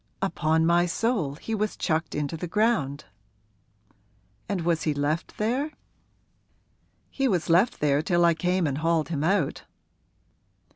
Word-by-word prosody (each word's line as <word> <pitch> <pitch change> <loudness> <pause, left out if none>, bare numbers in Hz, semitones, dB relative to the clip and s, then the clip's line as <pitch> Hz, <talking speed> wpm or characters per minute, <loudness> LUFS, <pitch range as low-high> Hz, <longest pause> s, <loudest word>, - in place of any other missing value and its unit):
'Upon 160 -4 +1
my 175 +1 +3
soul 185 - -1
he 225 +8 -6
was 215 0 -1
chucked 160 -2 -1
into 150 +2 -2
the 175 +2 -5
ground!' 185 - 0 1.4
'And 200 -3 -1
was 165 -1 0
he 150 -2 0
left 145 +4 -2
there?' 260 +8 -1 1.4
'He 270 -1 0
was 180 -7 0
left 185 +8 +3
there 145 -1 +2
till 175 +1 +2
I 170 - +5
came 180 +2 0
and 140 -1 -1
hauled 165 -1 +1
him 150 -3 -2
out.' 180 -4 0
170 Hz, 140 wpm, -26 LUFS, 155-200 Hz, 1.4 s, I